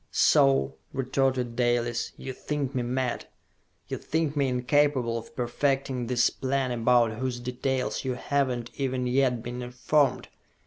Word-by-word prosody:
"So," 65 Hz, 0 st, +3 dB, 0.2 s
retorted 130 Hz, -2 st, 0 dB
Dalis, 120 Hz, -1 st, 0 dB
"you 130 Hz, -, -6 dB
think 145 Hz, 0 st, -3 dB
me 130 Hz, -, 0 dB
mad? 125 Hz, +1 st, -2 dB, 0.6 s
You -, -, -4 dB
think 160 Hz, -2 st, -1 dB
me 140 Hz, -2 st, +2 dB
incapable 130 Hz, -1 st, +2 dB
of 115 Hz, -1 st, -7 dB
perfecting 130 Hz, 0 st, -1 dB
this 120 Hz, -1 st, +3 dB
plan 135 Hz, -1 st, -1 dB
about 120 Hz, -1 st, +3 dB
whose 130 Hz, -2 st, -2 dB
details 125 Hz, +1 st, -2 dB
you 130 Hz, -2 st, -2 dB
have 140 Hz, +2 st, 0 dB
not 120 Hz, -2 st, -4 dB
even 130 Hz, -2 st, -1 dB
yet 125 Hz, -2 st, +1 dB
been 120 Hz, +1 st, -5 dB
informed! 125 Hz, +4 st, +1 dB
125 Hz, 140 wpm, -27 LUFS, 120-135 Hz, 0.6 s, So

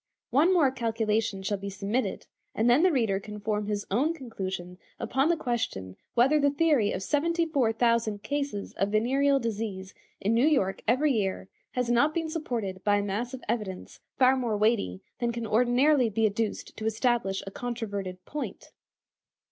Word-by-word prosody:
One 305 Hz, +8 st, +4 dB
more 315 Hz, -8 st, +4 dB
calculation 225 Hz, -4 st, -1 dB
shall 200 Hz, 0 st, -1 dB
be 200 Hz, 0 st, -5 dB
submitted, 200 Hz, +6 st, -2 dB, 0.3 s
and 225 Hz, -, +2 dB
then 245 Hz, +5 st, +5 dB
the 370 Hz, +1 st, +5 dB
reader 225 Hz, -9 st, +1 dB
can 210 Hz, +1 st, -8 dB
form 210 Hz, 0 st, -2 dB
his 205 Hz, -1 st, -2 dB
own 290 Hz, +11 st, +2 dB
conclusion 190 Hz, -, -6 dB, 0.2 s
upon 270 Hz, +4 st, +1 dB
the 340 Hz, -, +2 dB
question 100 Hz, -, -3 dB, 0.2 s
whether 270 Hz, +6 st, +4 dB
the 285 Hz, -1 st, +4 dB
theory 285 Hz, -7 st, +2 dB
of -, -, -3 dB
seventy 335 Hz, -, +1 dB
four 275 Hz, -8 st, +1 dB
thousand 225 Hz, -3 st, +1 dB
cases 280 Hz, -8 st, -3 dB
of 195 Hz, -, +1 dB
venereal 270 Hz, +6 st, +2 dB
disease 210 Hz, -5 st, -4 dB, 0.3 s
in 210 Hz, +3 st, +1 dB
New 240 Hz, +6 st, +4 dB
York 200 Hz, -11 st, +1 dB
every 270 Hz, +6 st, +3 dB
year 195 Hz, -5 st, -1 dB, 0.2 s
has 250 Hz, -1 st, 0 dB
not 240 Hz, +6 st, +3 dB
been 325 Hz, -1 st, -1 dB
supported 225 Hz, -, -3 dB
by 205 Hz, -1 st, +3 dB
a 205 Hz, -, +1 dB
mass 225 Hz, +6 st, -3 dB
of 255 Hz, -, -12 dB
evidence 210 Hz, -5 st, -4 dB, 0.2 s
far 260 Hz, 0 st, +5 dB
more 240 Hz, -5 st, -1 dB
weighty 205 Hz, -, +1 dB, 0.2 s
than 240 Hz, -1 st, 0 dB
can 235 Hz, -1 st, -4 dB
ordinarily 250 Hz, +4 st, +3 dB
be 220 Hz, +1 st, +1 dB
adduced 215 Hz, +1 st, -2 dB
to 220 Hz, -, -5 dB
establish 220 Hz, -3 st, 0 dB
a 195 Hz, -, -7 dB
controverted 200 Hz, -6 st, -5 dB
point. 295 Hz, 0 st, -6 dB
230 Hz, 170 wpm, -28 LUFS, 205-265 Hz, 0.3 s, then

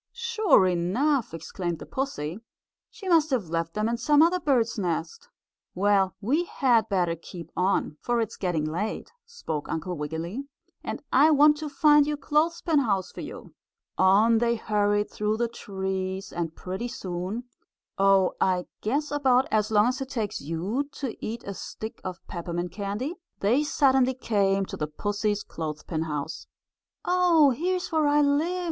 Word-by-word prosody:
"Sure 450 Hz, -, +3 dB
enough!" 225 Hz, -, +1 dB
exclaimed 170 Hz, +1 st, -4 dB
the -, -, -9 dB
pussy. 205 Hz, -, -4 dB, 0.5 s
"She 415 Hz, -4 st, -10 dB
must 325 Hz, -3 st, +4 dB
have 235 Hz, -, -1 dB
left 165 Hz, 0 st, -2 dB
them 215 Hz, +1 st, 0 dB
in 235 Hz, +1 st, -1 dB
some 295 Hz, +5 st, +4 dB
other 355 Hz, +2 st, +3 dB
bird's 240 Hz, -8 st, +1 dB
nest." 455 Hz, -, -3 dB, 0.5 s
"Well, 195 Hz, 0 st, +2 dB
we 285 Hz, -, +1 dB
had 245 Hz, -8 st, +2 dB
better 175 Hz, -4 st, +1 dB
keep 170 Hz, +1 st, -10 dB
on, 180 Hz, -4 st, 0 dB
for 240 Hz, -1 st, 0 dB
it 225 Hz, -2 st, 0 dB
is -, -, -11 dB
getting 175 Hz, -5 st, -1 dB
late," 180 Hz, +8 st, -3 dB, 0.2 s
spoke 160 Hz, -, -5 dB
Uncle 170 Hz, +3 st, -3 dB
Wiggily, 165 Hz, -, -4 dB, 0.4 s
"and -, -, -5 dB
I 290 Hz, +4 st, +6 dB
want 300 Hz, 0 st, +6 dB
to 305 Hz, 0 st, -5 dB
find 295 Hz, 0 st, +5 dB
your 300 Hz, 0 st, -1 dB
clothespin 315 Hz, +2 st, +1 dB
house 195 Hz, -8 st, 0 dB
for -, -, -8 dB
you." -, -, -9 dB, 0.4 s
On 210 Hz, +5 st, +5 dB
they 235 Hz, 0 st, +2 dB
hurried 205 Hz, -2 st, 0 dB
through 210 Hz, +1 st, -1 dB
the 235 Hz, +1 st, +1 dB
trees, 190 Hz, -3 st, -4 dB
and 165 Hz, -2 st, -3 dB
pretty 190 Hz, +6 st, -4 dB
soon 190 Hz, +1 st, -4 dB, 0.6 s
Oh, 195 Hz, -1 st, +4 dB
I 180 Hz, -1 st, +2 dB, 0.2 s
guess 285 Hz, +8 st, -1 dB
about 265 Hz, -3 st, +3 dB
as 215 Hz, -1 st, +2 dB
long 210 Hz, -1 st, +4 dB
as 255 Hz, +1 st, -3 dB
it 265 Hz, -, -4 dB
takes 225 Hz, -7 st, -3 dB
you 190 Hz, -, -2 dB
to 265 Hz, -5 st, -4 dB
eat 230 Hz, +2 st, -4 dB
a 200 Hz, -, -5 dB
stick 220 Hz, +3 st, -7 dB
of 185 Hz, -1 st, -7 dB
peppermint 175 Hz, 0 st, -4 dB
candy 205 Hz, -, -4 dB, 0.2 s
they 240 Hz, +9 st, +2 dB
suddenly 265 Hz, -3 st, +3 dB
came 195 Hz, -5 st, +1 dB
to -, -, -7 dB
the 150 Hz, -, -2 dB
pussy's 205 Hz, +5 st, -2 dB
clothespin 155 Hz, 0 st, -5 dB
house. 150 Hz, -2 st, -5 dB, 0.6 s
"Oh, 350 Hz, -5 st, +5 dB
here's 360 Hz, +8 st, -2 dB
where 315 Hz, -2 st, +2 dB
I 295 Hz, +1 st, +4 dB
live!" 300 Hz, +6 st, +1 dB
215 Hz, 165 wpm, -26 LUFS, 185-285 Hz, 0.6 s, I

